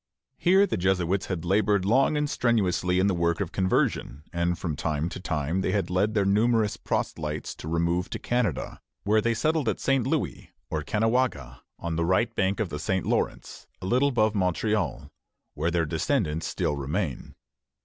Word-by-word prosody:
Here 190 Hz, +3 st, +5 dB
the -, -, -2 dB
Jesuits 95 Hz, +1 st, +1 dB
had 90 Hz, -3 st, -3 dB
labored 100 Hz, +1 st, +2 dB
long 130 Hz, +8 st, +3 dB
and 150 Hz, 0 st, +1 dB
strenuously 95 Hz, -9 st, +1 dB
in 95 Hz, -, +3 dB
the 100 Hz, -, +2 dB
work 85 Hz, -1 st, 0 dB
of 95 Hz, -4 st, -2 dB
conversion, 95 Hz, -6 st, 0 dB
and 85 Hz, 0 st, 0 dB
from 85 Hz, -3 st, -3 dB
time 75 Hz, +2 st, -1 dB
to -, -, -7 dB
time 80 Hz, 0 st, -1 dB
they -, -, 0 dB
had 100 Hz, -4 st, -1 dB
led 100 Hz, +4 st, +1 dB
their 100 Hz, -2 st, +2 dB
numerous 110 Hz, +1 st, +2 dB
proselytes 75 Hz, -7 st, -3 dB
to -, -, -8 dB
remove 85 Hz, +2 st, 0 dB
to -, -, -4 dB
Canada, 120 Hz, -8 st, -2 dB, 0.2 s
where 110 Hz, +1 st, +3 dB
they 115 Hz, +1 st, +1 dB
settled 155 Hz, 0 st, +1 dB
at -, -, -2 dB
St. 135 Hz, -3 st, +1 dB
Louis, 135 Hz, -, -2 dB, 0.2 s
or 80 Hz, -, -1 dB
Caughnawaga, 110 Hz, -, 0 dB, 0.2 s
on 85 Hz, -1 st, -3 dB
the 85 Hz, -, +1 dB
right 95 Hz, +7 st, +2 dB
bank 95 Hz, +1 st, +1 dB
of 105 Hz, -5 st, -1 dB
the 75 Hz, -, -5 dB
St. 95 Hz, +2 st, -1 dB
Lawrence, -, -, -2 dB
a -, -, -7 dB
little 125 Hz, +8 st, +3 dB
above 110 Hz, -5 st, +2 dB
Montreal, 95 Hz, -, -1 dB, 0.4 s
where 80 Hz, +3 st, -1 dB
their 85 Hz, -1 st, +1 dB
descendants 80 Hz, -, -1 dB
still 75 Hz, -, -1 dB
remain. 70 Hz, +2 st, -3 dB
95 Hz, 180 wpm, -26 LUFS, 85-110 Hz, 0.4 s, Here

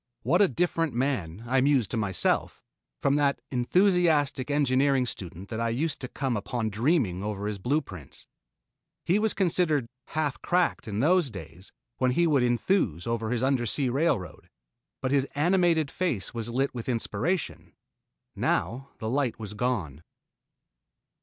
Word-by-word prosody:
What 170 Hz, -, +3 dB
a 200 Hz, -, +6 dB
different 165 Hz, -5 st, 0 dB
man, 115 Hz, -, -1 dB
I 130 Hz, +2 st, +2 dB
mused 135 Hz, -5 st, +2 dB
to -, -, -2 dB
myself, 100 Hz, -4 st, 0 dB, 0.4 s
from 140 Hz, +1 st, +3 dB
that 140 Hz, -1 st, +2 dB
enthusiastic 150 Hz, -1 st, +2 dB
engineering 135 Hz, -2 st, +2 dB
student 95 Hz, -4 st, -6 dB
that 110 Hz, -, -4 dB
I 115 Hz, 0 st, 0 dB
used 145 Hz, +6 st, -1 dB
to 125 Hz, -, -3 dB
come 135 Hz, -1 st, -2 dB
upon 110 Hz, +1 st, -2 dB
dreaming 110 Hz, -, +1 dB
over 105 Hz, -1 st, -3 dB
his 105 Hz, -1 st, -3 dB
blue 140 Hz, +10 st, +1 dB
prints. 90 Hz, -, -10 dB, 0.8 s
He 180 Hz, +5 st, +3 dB
was 220 Hz, 0 st, +1 dB
considered 170 Hz, -, +2 dB, 0.2 s
"half 155 Hz, -3 st, -2 dB
cracked" 180 Hz, -7 st, +1 dB
in 105 Hz, +1 st, -2 dB
those 170 Hz, 0 st, +3 dB
days 95 Hz, -3 st, -8 dB, 0.3 s
when 130 Hz, -, +2 dB
he 170 Hz, +5 st, +3 dB
would 145 Hz, -5 st, +3 dB
enthuse 120 Hz, -, +1 dB
over 115 Hz, -1 st, -2 dB
his 120 Hz, +1 st, -1 dB
undersea 130 Hz, 0 st, +1 dB
railroad, 135 Hz, -, -1 dB, 0.5 s
but 130 Hz, -, -1 dB
his 140 Hz, -1 st, +2 dB
animated 165 Hz, -1 st, +2 dB
face 165 Hz, -, -2 dB
was 115 Hz, -1 st, -4 dB
lit 135 Hz, +4 st, 0 dB
with 120 Hz, 0 st, -5 dB
inspiration. 125 Hz, -, -2 dB, 0.6 s
Now 135 Hz, +4 st, -1 dB
the 110 Hz, -, -5 dB
light 130 Hz, 0 st, 0 dB
was 105 Hz, -2 st, -6 dB
gone. 105 Hz, -, -2 dB
130 Hz, 150 wpm, -27 LUFS, 110-155 Hz, 0.8 s, a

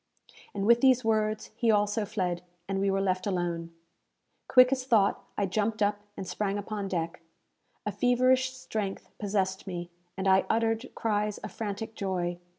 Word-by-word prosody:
And 200 Hz, 0 st, -1 dB
with 235 Hz, +2 st, +5 dB
these 255 Hz, -3 st, +5 dB
words 215 Hz, -1 st, 0 dB
he 230 Hz, 0 st, +1 dB
also 210 Hz, 0 st, +2 dB
fled, 180 Hz, -4 st, -1 dB, 0.3 s
and 195 Hz, 0 st, -1 dB
we 195 Hz, 0 st, +2 dB
were 195 Hz, 0 st, +1 dB
left 185 Hz, 0 st, 0 dB
alone. 170 Hz, -3 st, -2 dB, 0.8 s
Quick 255 Hz, 0 st, +7 dB
as 260 Hz, -1 st, 0 dB
thought, 220 Hz, -6 st, +3 dB
I 205 Hz, -, +2 dB
jumped 210 Hz, +3 st, 0 dB
up 205 Hz, 0 st, +1 dB, 0.2 s
and 190 Hz, -, -5 dB
sprang 205 Hz, +1 st, -1 dB
upon 205 Hz, 0 st, -4 dB
deck. 170 Hz, -3 st, -3 dB, 0.6 s
A -, -, -1 dB
feverish 255 Hz, +1 st, +3 dB
strength 215 Hz, -6 st, -4 dB
possessed 195 Hz, -2 st, -1 dB
me, 175 Hz, -2 st, -5 dB, 0.3 s
and 195 Hz, 0 st, -1 dB
I 190 Hz, 0 st, +4 dB
uttered 225 Hz, +2 st, +1 dB
cries 210 Hz, -2 st, 0 dB
of -, -, -7 dB
frantic 220 Hz, +1 st, -4 dB
joy. 180 Hz, -4 st, -2 dB
205 Hz, 160 wpm, -29 LUFS, 190-225 Hz, 0.8 s, Quick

